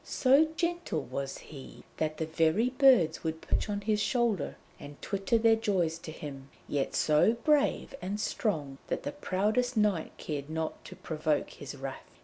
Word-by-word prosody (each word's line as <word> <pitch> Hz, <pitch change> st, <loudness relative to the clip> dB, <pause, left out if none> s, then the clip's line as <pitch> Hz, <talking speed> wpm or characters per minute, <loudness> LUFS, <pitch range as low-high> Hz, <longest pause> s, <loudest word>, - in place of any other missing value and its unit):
So 275 Hz, +4 st, +4 dB
gentle 340 Hz, -, -1 dB
was 135 Hz, +2 st, -4 dB
he 140 Hz, -4 st, -11 dB
that 155 Hz, -1 st, -1 dB
the 160 Hz, -, -1 dB
very 165 Hz, +9 st, +2 dB
birds 250 Hz, -, +4 dB
would 160 Hz, -1 st, -2 dB
perch -, -, -1 dB
on 205 Hz, 0 st, -2 dB
his 210 Hz, 0 st, +1 dB
shoulder 225 Hz, -, 0 dB, 0.2 s
and 145 Hz, 0 st, -10 dB
twitter 200 Hz, +4 st, 0 dB
their 225 Hz, 0 st, +5 dB
joys 185 Hz, -7 st, 0 dB
to 160 Hz, -, -8 dB
him, 140 Hz, -3 st, -8 dB, 0.2 s
yet 140 Hz, -2 st, -1 dB
so 155 Hz, +8 st, +4 dB
brave 285 Hz, +5 st, +1 dB
and 200 Hz, +3 st, -3 dB
strong 150 Hz, -, -2 dB
that -, -, -2 dB
the 285 Hz, -, -3 dB
proudest 245 Hz, -1 st, 0 dB
knight 205 Hz, -6 st, +1 dB
cared 145 Hz, -2 st, -5 dB
not 160 Hz, 0 st, -3 dB
to -, -, -9 dB
provoke 155 Hz, -2 st, -1 dB
his 140 Hz, 0 st, -8 dB
wrath. 135 Hz, -1 st, -8 dB
180 Hz, 165 wpm, -30 LUFS, 155-230 Hz, 0.2 s, their